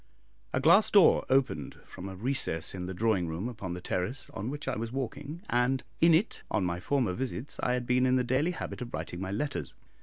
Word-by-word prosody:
A - - +1
glass - - +6
door - - +6
opened 130 - +1
from 95 +1 -8
a 95 - -7
recess 100 - -1
in 90 -1 -5
the 95 - -4
drawing 105 -4 +1
room 80 +7 -3
upon 100 -7 -5
the 90 - -7
terrace 95 +10 -3
on 105 +5 -4
which 145 +1 -6
I - - 0
was 115 +1 -4
walking, 140 - -5
and 125 +2 +1 0.2
in 165 0 +6
it, 195 +8 +1
on 105 -4 +1
my 85 0 -1
former 125 -2 0
visits, 130 +4 -4
I 125 - +1
had 125 -1 -2
been 125 +1 +3
in 130 - +3
the 125 - +2
daily 130 +7 +1
habit 165 - -6
of 120 -1 -5
writing 85 - -5
my 95 - -3
letters. 145 +7 -3
120 Hz, 220 wpm, -30 LUFS, 95-135 Hz, 0.2 s, glass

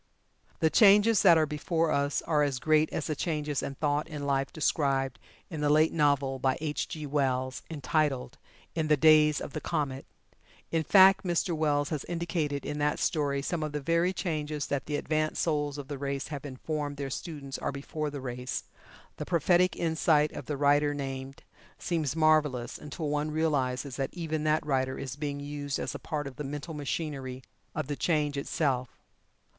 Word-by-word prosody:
The 160 - +3
changes 210 +1 +6
that 175 -5 +7
are 155 - +4
before 160 +2 -1
us 140 0 0
are 150 -2 +1
as 140 -3 +1
great 155 +3 +2
as 155 - -2
the 155 - -2
changes 150 -2 -2
in 140 - -4
thought 145 +1 0
and 150 -2 -5
life 135 -1 0
described 135 -4 0 0.3
in 160 -4 -6
the 145 - +2
late 155 +2 +4
novel 140 -3 +2
by 130 0 +1
H. 150 -1 -2
G. 155 -2 -6
Wells, 130 -3 -1
entitled 150 -4 -1 0.3
"In 160 -2 -1
the 150 -1 +4
Days 150 0 +6
of - - -7
the 155 - -4
Comet." 135 -3 -2 0.6
In 165 - +2
fact, 190 +3 +6
Mr. 175 -1 0
Wells 145 -2 +1
has 155 -4 -3
indicated 165 -4 -2
in 150 - -3
that 150 0 +1
story 140 -3 0
some 170 +2 -2
of 155 -1 -3
the 150 - -1
very 170 +5 +2
changes 155 -5 -3
that 140 -1 -3
the 150 - -1
advanced 155 +1 0
souls 145 -3 0
of 140 -2 -7
the 145 -2 -5
race 140 -1 -3
have 145 -2 -6
informed 145 +2 -4
their 135 -1 -4
students 140 -3 -6
are - - -2
before 150 +2 -4
the 145 -2 -6
race 125 -1 -4 0.5
the - - -4
prophetic 175 +1 +3
insight 160 -2 +2
of - - -8
the 145 - -2
writer 145 +1 +3
named 135 -1 -6 0.3
seems 160 -5 -1
marvelous, 155 -6 +2
until 150 +2 -5
one 150 +1 0
realizes 140 -4 -1
that 135 -1 -1
even 160 -3 -3
that 155 0 +2
writer 130 -2 0
is 130 -2 -5
being 145 -1 -4
used 145 0 -4
as - - -3
a - - -6
part 150 -1 -3
of 135 -2 -8
the 150 - -4
mental 145 +3 -5
machinery 140 -3 -4 0.3
of - - -1
The 145 +1 -3
Change 150 -2 0
itself. 135 -3 -1
150 Hz, 185 wpm, -29 LUFS, 140-155 Hz, 0.6 s, that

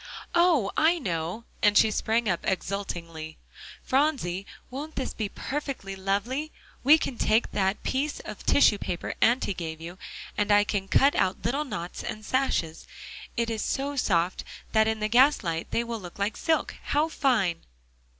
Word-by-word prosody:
"Oh! 340 - +4
I 330 +3 +4
know," 175 - -3 0.2
and 205 -1 +5
she 220 - +5
sprang 225 +2 0
up 175 -3 +1
exultingly. 170 -5 -4 0.5
"Phronsie, 255 - 0 0.2
won't 295 +5 -6
this 265 - -3
be 215 -3 -3
perfectly 270 -9 -4
lovely? 205 +11 -2 0.3
we 295 +5 +8
can 255 -6 -4
take 220 +2 +2
that 195 0 0
piece 285 +3 -1
of - - -8
tissue 210 -7 +4
paper 175 - -3
Auntie 235 -3 +3
gave 160 -3 -5
you, 175 +3 -9 0.4
and 210 0 +1
I 205 0 +6
can 205 -2 -2
cut 275 +7 +4
out 185 - 0
little 285 +4 0
knots 175 - -5
and 215 -1 -6
sashes. 195 -12 -1 0.5
It 230 0 0
is 220 -2 -2
so 280 +1 -2
soft, 180 -8 +1 0.3
that 220 -1 +4
in 220 -1 -1
the 215 - +1
gaslight 225 - +3
they 235 - 0
will 230 -1 -4
look 175 -3 -10
like 200 +2 -1
silk. 320 -1 0
How 300 +2 +2
fine!" 235 - +1
215 Hz, 160 wpm, -27 LUFS, 190-270 Hz, 0.5 s, we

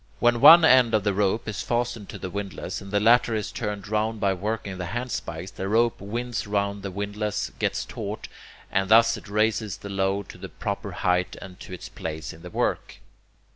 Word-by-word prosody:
When 120 -1 +3
one 170 0 +10
end 125 -5 +6
of 105 - +1
the 105 -1 +1
rope 105 +3 0
is 110 - -3
fastened 120 -3 -2
to - - -7
the 95 - -6
windlass, 100 +1 -5
and 100 - -10
the 105 +1 +1
latter 115 +1 +4
is 105 - -3
turned 105 -3 -4
round 110 +1 -1
by 100 -1 +2
working 100 0 -4
the 90 - -3
handspikes, 95 -8 -5
the 95 - -5
rope 115 +2 +2
winds 115 +2 -3
round 100 0 -1
the 100 - -4
windlass, 100 +2 -3
gets - - -1
taut, - - -6 0.4
and 95 0 +1
thus 115 +1 +6
it - - -11
raises 110 -1 0
the 100 - -9
load 95 0 -1
to - - -11
the - - -7
proper - - -4
height 90 0 0
and 90 -2 -11
to - - -11
its 90 - -7
place 80 -1 -6
in 80 - -14
the 90 - -9
work. - - -2
105 Hz, 205 wpm, -25 LUFS, 95-115 Hz, 0.4 s, one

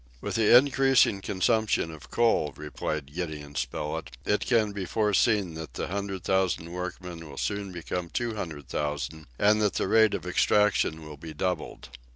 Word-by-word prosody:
"With - - -4
the 115 +1 +7
increasing 135 -6 +4
consumption 105 -2 +1
of 80 -3 -12
coal," 115 -10 +2
replied 75 -1 -4
Gideon 75 -4 -5
Spilett, 75 +3 -3 0.2
"it 105 - 0
can 110 -4 +3
be 100 -2 -4
foreseen 105 -1 +2
that 80 -5 -8
the - - -3
hundred 100 -1 -4
thousand 95 -3 0
workmen 90 -2 -6
will 70 - -11
soon 100 -2 -2
become 85 0 -4
two 120 +3 -2
hundred 80 -9 -6
thousand, 75 +1 -3
and 105 +1 +4
that 105 -2 +1
the - - 0
rate 110 +1 +5
of - - -5
extraction 100 -6 +2
will 75 -1 -9
be 80 +1 -9
doubled." 90 -5 -3
90 Hz, 165 wpm, -27 LUFS, 80-105 Hz, 0.2 s, the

